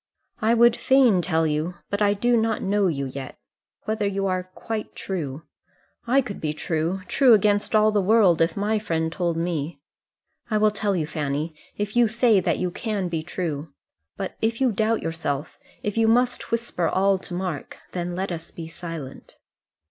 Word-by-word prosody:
"I 225 Hz, +2 st, +3 dB
would 235 Hz, 0 st, +6 dB
fain 255 Hz, -8 st, +4 dB
tell 160 Hz, 0 st, +1 dB
you, 155 Hz, +3 st, -1 dB, 0.2 s
but 200 Hz, +1 st, -1 dB
I 205 Hz, 0 st, +4 dB
do 240 Hz, +4 st, +2 dB
not 225 Hz, -1 st, +1 dB
know 200 Hz, 0 st, +2 dB
you 140 Hz, -5 st, -1 dB
yet, 135 Hz, 0 st, -7 dB, 0.5 s
whether 215 Hz, -1 st, -1 dB
you 195 Hz, 0 st, -1 dB
are 185 Hz, -1 st, -1 dB
quite 220 Hz, -2 st, -5 dB
true. 160 Hz, -6 st, -4 dB, 0.6 s
I 265 Hz, +3 st, +4 dB
could 215 Hz, -6 st, -7 dB
be 150 Hz, -1 st, -1 dB
true, 165 Hz, +4 st, -2 dB
true 255 Hz, -5 st, +6 dB
against 205 Hz, +1 st, +2 dB
all 215 Hz, 0 st, +5 dB
the 210 Hz, -1 st, +2 dB
world, 195 Hz, -4 st, +4 dB
if 165 Hz, +2 st, +2 dB
my 210 Hz, +2 st, +1 dB
friend 160 Hz, -5 st, -1 dB
told 170 Hz, -1 st, -1 dB
me. 165 Hz, -3 st, -2 dB, 0.7 s
I 215 Hz, -, +2 dB
will 215 Hz, 0 st, +4 dB
tell 205 Hz, -1 st, -1 dB
you, 160 Hz, -4 st, 0 dB
Fanny, 150 Hz, +1 st, -3 dB, 0.2 s
if 205 Hz, +1 st, -3 dB
you 240 Hz, -1 st, +5 dB
say 230 Hz, -2 st, +4 dB
that 180 Hz, -, 0 dB
you 180 Hz, -1 st, -1 dB
can 205 Hz, -2 st, -2 dB
be 165 Hz, -2 st, -2 dB
true. 160 Hz, -3 st, -4 dB, 0.4 s
But 195 Hz, -, -4 dB
if 225 Hz, +1 st, 0 dB
you 260 Hz, -2 st, +3 dB
doubt 220 Hz, +2 st, 0 dB
yourself, 160 Hz, -3 st, -3 dB, 0.2 s
if 210 Hz, +1 st, -2 dB
you 225 Hz, -, +4 dB
must 245 Hz, +2 st, +2 dB
whisper 230 Hz, -7 st, -1 dB
all 195 Hz, 0 st, +2 dB
to 175 Hz, -, -7 dB
Mark 180 Hz, -6 st, -4 dB
then 175 Hz, -1 st, -3 dB
let 190 Hz, +1 st, -2 dB
us 165 Hz, -1 st, -5 dB
be 165 Hz, -1 st, -8 dB
silent." 165 Hz, -4 st, -8 dB
190 Hz, 185 wpm, -24 LUFS, 165-215 Hz, 0.7 s, would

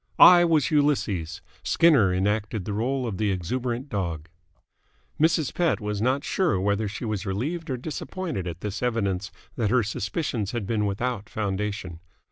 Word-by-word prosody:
I 175 Hz, -1 st, +9 dB
was 160 Hz, -5 st, +2 dB
Ulysses, 110 Hz, -, +1 dB, 0.2 s
Skinner 145 Hz, -, +4 dB
enacted 105 Hz, +2 st, -1 dB
the 105 Hz, -, -3 dB
role 125 Hz, +5 st, -1 dB
of 110 Hz, -5 st, -3 dB
the 105 Hz, 0 st, +1 dB
exuberant 120 Hz, -, -2 dB
dog." 85 Hz, -, -3 dB, 0.9 s
Mrs. 160 Hz, -2 st, +2 dB
Pett 175 Hz, -2 st, +1 dB
was 105 Hz, -1 st, -3 dB
not 130 Hz, +4 st, +1 dB
sure 175 Hz, -, +1 dB
whether 100 Hz, +2 st, 0 dB
she 105 Hz, +4 st, -5 dB
was 105 Hz, -4 st, -2 dB
relieved 150 Hz, -, -3 dB
or 130 Hz, -, -1 dB
disappointed 155 Hz, -, -4 dB
at 85 Hz, 0 st, -6 dB
this 105 Hz, -1 st, -4 dB
evidence 105 Hz, -5 st, -1 dB, 0.3 s
that 115 Hz, -4 st, +1 dB
her 125 Hz, +1 st, +3 dB
suspicions 105 Hz, -, -2 dB
had 120 Hz, -4 st, -2 dB
been 105 Hz, 0 st, 0 dB
without 105 Hz, +1 st, -3 dB
foundation. 100 Hz, -4 st, -3 dB
110 Hz, 155 wpm, -25 LUFS, 100-130 Hz, 0.9 s, I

